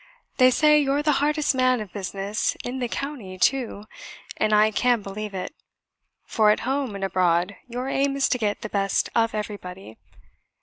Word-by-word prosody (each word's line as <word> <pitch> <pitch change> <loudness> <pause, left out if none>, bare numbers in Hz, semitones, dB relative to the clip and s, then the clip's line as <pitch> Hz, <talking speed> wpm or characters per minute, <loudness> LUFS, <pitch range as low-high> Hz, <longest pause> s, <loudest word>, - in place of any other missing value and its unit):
They 255 -1 +7
say 300 +4 +4
you're 285 0 +1
the 300 - +3
hardest 300 0 +1
man 255 -1 +2
of 210 -4 -8
business 200 +1 -2
in 255 +2 -4
the 245 - -1
county 235 -9 -6
too, 240 -1 0 0.5
and 215 - 0
I 215 +1 +4
can 240 0 +1
believe 200 +1 -6
it; 185 +9 -5 0.7
for 215 -2 +3
at 210 - +2
home 265 -2 -2
and 195 - -5
abroad 180 0 +1
your 250 +2 -4
aim 275 0 0
is 275 - +2
to 250 - 0
get 210 -2 -1
the - - -4
best 195 -2 0
of 230 -1 +1
everybody. 190 - -7
220 Hz, 175 wpm, -24 LUFS, 200-265 Hz, 0.7 s, They